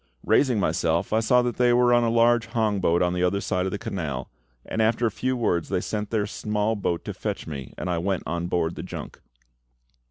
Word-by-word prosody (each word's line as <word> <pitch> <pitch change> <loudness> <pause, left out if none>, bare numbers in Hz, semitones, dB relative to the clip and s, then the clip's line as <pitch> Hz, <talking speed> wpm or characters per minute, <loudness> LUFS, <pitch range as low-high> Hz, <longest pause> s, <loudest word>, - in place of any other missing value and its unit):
Raising 125 -6 +3
myself, 85 +1 0
I 110 - +4
saw 125 +3 +3
that 120 -2 -2
they 125 -1 +4
were 120 0 +4
on 120 0 +4
a 115 - +2
large 115 0 +3
hong 110 -3 0
boat 85 -1 +2
on 90 0 +1
the 90 - -1
other 90 +2 +2
side 90 -1 -1
of - - -3
the 100 - -2
canal, 75 -11 -4 0.3
and 110 - -2
after 115 +2 +2
a 110 - +1
few 130 +4 -1
words 85 -8 0
they - - +1
sent 105 +2 -3
their 110 -3 0
small 105 +1 -1
boat 90 -5 -2
to - - -4
fetch - - -4
me, 70 -4 -7
and - - -4
I 90 -2 0
went 95 +2 -1
on 85 0 -2
board 85 -2 0
the - - -6
junk. - - -8
105 Hz, 230 wpm, -25 LUFS, 85-115 Hz, 0.3 s, I